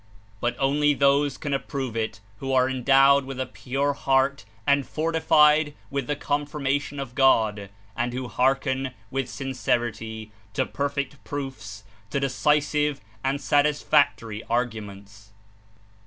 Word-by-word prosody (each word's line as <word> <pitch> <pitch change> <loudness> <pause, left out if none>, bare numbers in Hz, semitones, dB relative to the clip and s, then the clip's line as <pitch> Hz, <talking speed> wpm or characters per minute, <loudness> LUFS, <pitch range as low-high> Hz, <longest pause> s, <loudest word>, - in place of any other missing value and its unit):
But 120 +2 -1
only 145 +2 +2
those 140 0 +3
can 145 -2 -3
approve 135 -3 -3
it 110 -3 -3 0.2
who 135 0 -3
are 130 -1 +4
endowed 135 +2 +4
with 130 0 -7
a 130 - 0
pure 135 +3 -2
heart 135 -4 +1 0.2
and 140 0 +3
fortified 155 -1 +3 0.2
with 140 -3 -2
the 145 - 0
confirmation 145 -1 -2
of 135 -3 -6
God, 110 -7 +3 0.3
and 120 +1 -1
who 125 +1 -4
hearken 130 +2 0 0.2
with 135 -2 -2
sincerity 120 -4 -3 0.2
to - - +1
perfect 140 -1 -3
proofs, 110 -8 -6 0.3
to 140 - -1
decisive 150 +1 +1 0.2
and 135 +1 0
satisfactory 145 -6 +2
arguments. 105 -4 -4
135 Hz, 125 wpm, -25 LUFS, 120-145 Hz, 0.3 s, are